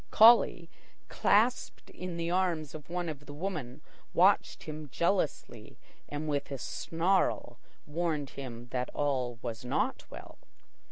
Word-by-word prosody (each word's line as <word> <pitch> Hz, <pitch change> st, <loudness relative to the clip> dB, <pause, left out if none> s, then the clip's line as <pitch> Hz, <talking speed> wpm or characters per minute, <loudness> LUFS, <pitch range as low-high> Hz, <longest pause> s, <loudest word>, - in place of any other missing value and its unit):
Collie, 220 Hz, -6 st, +6 dB, 0.4 s
clasped 230 Hz, +5 st, +1 dB
in 180 Hz, -1 st, -6 dB
the 170 Hz, 0 st, -2 dB
arms 175 Hz, -5 st, 0 dB
of 155 Hz, -1 st, -9 dB
one 175 Hz, 0 st, -2 dB
of 145 Hz, -2 st, -6 dB
the 145 Hz, -, -8 dB
women, 155 Hz, -8 st, -4 dB, 0.3 s
watched -, -, +4 dB
him 155 Hz, -1 st, -7 dB
jealously 170 Hz, +1 st, -1 dB, 0.3 s
and 145 Hz, +1 st, -4 dB
with 145 Hz, -2 st, -1 dB
a 135 Hz, -, -3 dB
snarl 165 Hz, -, 0 dB, 0.3 s
warned 155 Hz, -2 st, -2 dB
him 120 Hz, -3 st, -8 dB
that 125 Hz, -1 st, -2 dB
all 130 Hz, -4 st, 0 dB
was 115 Hz, -1 st, -5 dB
not 125 Hz, -, -1 dB
well. -, -, -11 dB
155 Hz, 130 wpm, -31 LUFS, 135-175 Hz, 0.4 s, Collie